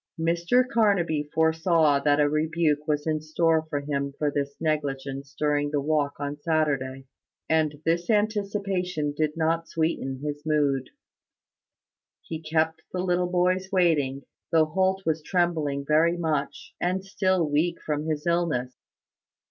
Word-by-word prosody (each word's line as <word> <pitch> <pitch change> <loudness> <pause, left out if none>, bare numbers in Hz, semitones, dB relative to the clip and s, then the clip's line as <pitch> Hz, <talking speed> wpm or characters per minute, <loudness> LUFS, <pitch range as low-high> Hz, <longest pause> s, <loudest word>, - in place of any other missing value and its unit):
Mr 170 +10 +2
Carnaby 175 -11 +1
foresaw 160 -2 +3
that 145 +1 +2
a 145 - +4
rebuke 155 0 0
was 150 -1 0
in 155 -1 0
store 160 0 +1
for 145 -2 -2
him 140 -1 -2
for 150 -1 0
his 140 0 -2
negligence 140 -3 -3
during 145 -1 +1
the 145 -1 0
walk 145 0 0
on 145 0 -4
Saturday; 140 -5 0 0.4
and 155 -2 +1
this 170 +1 0
anticipation 200 -7 0
did 155 +1 -1
not 165 +1 0
sweeten 155 -5 -2
his 145 0 -4
mood. 145 -4 +1 1.3
He 160 -1 -6
kept 160 0 0
the 180 0 -2
little 180 -1 +1
boys 185 +1 +1
waiting, 150 -8 +2 0.3
though 160 -1 +5
Holt 190 +4 0
was 160 -1 0
trembling 155 -5 0
very 165 +3 +3
much, 150 -3 -2
and 185 +2 -1
still 185 -3 +1
weak 160 +4 0
from 150 0 -3
his 155 -1 -2
illness. 160 -8 0
155 Hz, 140 wpm, -26 LUFS, 145-170 Hz, 1.3 s, though